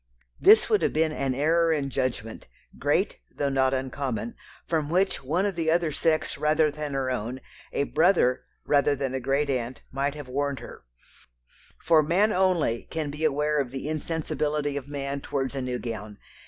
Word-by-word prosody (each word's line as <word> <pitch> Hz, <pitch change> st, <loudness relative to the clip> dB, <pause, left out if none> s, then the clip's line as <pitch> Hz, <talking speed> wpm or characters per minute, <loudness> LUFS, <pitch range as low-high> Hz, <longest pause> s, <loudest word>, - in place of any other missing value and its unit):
This 420 Hz, +4 st, +7 dB
would 425 Hz, -2 st, +3 dB
have -, -, +1 dB
been 155 Hz, 0 st, +2 dB
an 135 Hz, -4 st, -1 dB
error 165 Hz, +4 st, +3 dB
in 140 Hz, -3 st, -1 dB
judgment, 115 Hz, -4 st, -3 dB, 0.3 s
great -, -, +1 dB
though 140 Hz, -, -1 dB
not 130 Hz, -1 st, +2 dB
uncommon, 130 Hz, -4 st, -3 dB, 0.3 s
from 155 Hz, -3 st, 0 dB
which 185 Hz, -2 st, +1 dB
one 165 Hz, +9 st, 0 dB
of 200 Hz, -2 st, -1 dB
the 165 Hz, -1 st, 0 dB
other 165 Hz, -1 st, +2 dB
sex 155 Hz, -1 st, 0 dB
rather 155 Hz, 0 st, +3 dB
than 150 Hz, -1 st, -5 dB
her 130 Hz, -1 st, 0 dB
own, 125 Hz, +1 st, -3 dB, 0.3 s
a -, -, 0 dB
brother 155 Hz, -4 st, +3 dB, 0.2 s
rather 145 Hz, 0 st, +3 dB
than 135 Hz, -1 st, -3 dB
a 130 Hz, -, -1 dB
great 135 Hz, +3 st, 0 dB
aunt, 125 Hz, -1 st, -3 dB
might 140 Hz, +2 st, -1 dB
have 145 Hz, -3 st, -8 dB
warned 140 Hz, +2 st, -1 dB
her; -, -, -11 dB, 0.9 s
for 160 Hz, -1 st, +4 dB
man 190 Hz, +8 st, +2 dB
only 175 Hz, -11 st, +1 dB
can 155 Hz, -3 st, -3 dB
be 150 Hz, +2 st, -6 dB
aware 150 Hz, 0 st, +2 dB
of 130 Hz, -, -4 dB
the 135 Hz, +3 st, -5 dB
insensibility 150 Hz, -2 st, -2 dB
of 140 Hz, -1 st, -5 dB
man 140 Hz, -1 st, -4 dB
towards 135 Hz, -2 st, -2 dB
a 135 Hz, -, -3 dB
new 125 Hz, -1 st, -2 dB
gown. 110 Hz, -4 st, -6 dB
145 Hz, 180 wpm, -26 LUFS, 130-160 Hz, 0.9 s, This